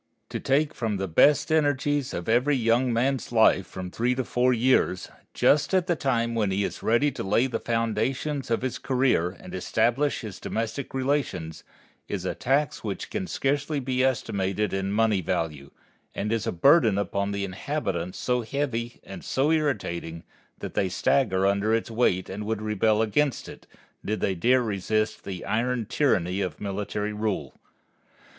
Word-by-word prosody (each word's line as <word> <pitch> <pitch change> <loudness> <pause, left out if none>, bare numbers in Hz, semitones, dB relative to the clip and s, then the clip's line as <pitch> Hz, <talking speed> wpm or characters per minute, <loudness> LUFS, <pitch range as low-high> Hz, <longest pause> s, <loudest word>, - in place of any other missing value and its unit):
To - - -4
take 145 +2 +1
from 110 -4 -2
the 95 0 -2
best 140 - +4
energies 145 -2 +1
of 85 - -5
every 125 +6 +3
young 120 +1 +2
man's 130 +3 0
life 110 -5 +4
from 90 -1 -7
three 125 +5 0
to 130 - -1
four 125 +1 +1
years, 120 -7 +2 0.3
just 150 +5 +3
at 185 -2 +3
the 175 -2 +1
time 115 -5 0
when 110 -3 +1
he 95 +1 0
is - - -4
ready 120 +6 +2
to 140 - -6
lay 105 +6 +2
the 120 -4 -2
foundations 120 +5 -1
of 115 +1 0
his 130 - -2
career 125 -10 +1
and - - -11
establish 120 +9 +1
his 105 -5 -8
domestic 115 +5 -4
relations, 120 - -2 0.4
is - - -4
a - - -1
tax 140 +4 0
which 105 -3 -5
can 190 -3 -3
scarcely 145 +1 -1
be 130 -1 0
estimated 105 -5 0
in 95 0 -1
money 105 -2 +2
value, 80 -6 -3 0.5
and 105 +2 -2
is 115 -2 -1
a - - +1
burden 115 - +4
upon 100 0 -1
the 100 0 -2
inhabitants 95 - -3
so 125 -1 0
heavy 120 -2 -3
and 95 - -9
so 140 +4 +1
irritating 95 - -1 0.3
that - - -7
they 95 - +1
stagger 95 0 +1
under 100 +3 +2
its 115 0 -3
weight 110 -6 +1
and 105 +2 -6
would 110 -1 -2
rebel 110 +1 +2
against 140 +6 0
it, - - -12 0.4
did 110 +1 -2
they 95 - 0
dare 125 +8 +3
resist 110 0 -1
the 95 -2 -6
iron 120 +1 0
tyranny 95 - +1
of 90 -5 -3
military 105 +1 -3
rule. 105 -2 -2
115 Hz, 170 wpm, -26 LUFS, 100-130 Hz, 0.5 s, best